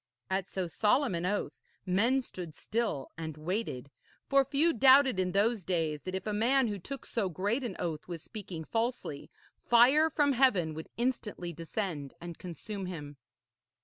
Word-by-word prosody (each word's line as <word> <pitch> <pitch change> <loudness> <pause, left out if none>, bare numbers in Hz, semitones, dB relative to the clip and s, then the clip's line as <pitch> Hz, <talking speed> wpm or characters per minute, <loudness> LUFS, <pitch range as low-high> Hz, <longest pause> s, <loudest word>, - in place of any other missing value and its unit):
At 190 -1 0
so 190 -1 -2
solemn 215 - +2
an 170 +1 -1
oath 205 +2 -1 0.3
men 230 +9 +2
stood 175 -9 -8
still 220 - -2
and 160 -2 -5
waited, 155 - -3 0.3
for 275 -1 +4
few 305 +5 +2
doubted 265 -2 +6
in 180 -1 +1
those 205 +2 +2
days 160 -4 -1
that 185 0 -3
if 190 - -4
a 210 - -1
man 240 +4 +3
who 205 -1 -3
took 275 +9 -7
so 210 -5 -1
great 205 - -1
an 225 -7 -4
oath 160 -3 -4
was 170 -3 -6
speaking 185 -7 -7
falsely, 225 - -3 0.3
fire 265 +7 +5
from 290 -2 +2
heaven 205 -12 +3
would 160 +1 -7
instantly 220 -8 -2
descend 165 -3 -4
and 170 -1 -8
consume 185 +3 -6
him. 145 -5 -7
195 Hz, 165 wpm, -31 LUFS, 170-240 Hz, 0.3 s, doubted